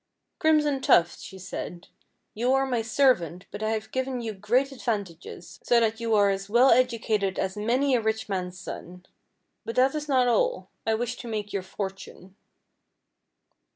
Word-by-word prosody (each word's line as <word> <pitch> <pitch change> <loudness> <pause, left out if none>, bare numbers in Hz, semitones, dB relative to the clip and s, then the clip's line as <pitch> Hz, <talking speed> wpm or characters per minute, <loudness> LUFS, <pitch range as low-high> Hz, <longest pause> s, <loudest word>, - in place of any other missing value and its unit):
"Crimson 300 -3 +3
Tuft," 170 -8 +4
she 190 - -10
said, 180 -1 -7 0.5
"you 245 +4 +1
are 270 0 +3
my 245 -3 0
servant, 220 - +1
but 205 - -7
I 215 - 0
have 220 -1 -3
given 260 -1 -2
you 225 -2 -4
great 240 +8 +1
advantages, 200 -9 -5
so 240 - +4
that 225 -1 0
you 230 -1 +1
are 200 -1 +4
as 195 +1 -4
well 245 +5 +5
educated 230 -5 +1
as 190 0 -2
many 250 +6 +1
a 245 - +3
rich 220 0 -1
man's 185 -2 -3
son. 180 0 -9 0.6
But 230 - -5
that 260 +2 +4
is 300 -1 -4
not 255 -2 +3
all; - - +1 0.2
I 220 - +3
wish 240 +2 -3
to 240 - -8
make 210 -2 -4
your 200 - -1
fortune." 190 0 -7
220 Hz, 170 wpm, -26 LUFS, 195-255 Hz, 0.6 s, well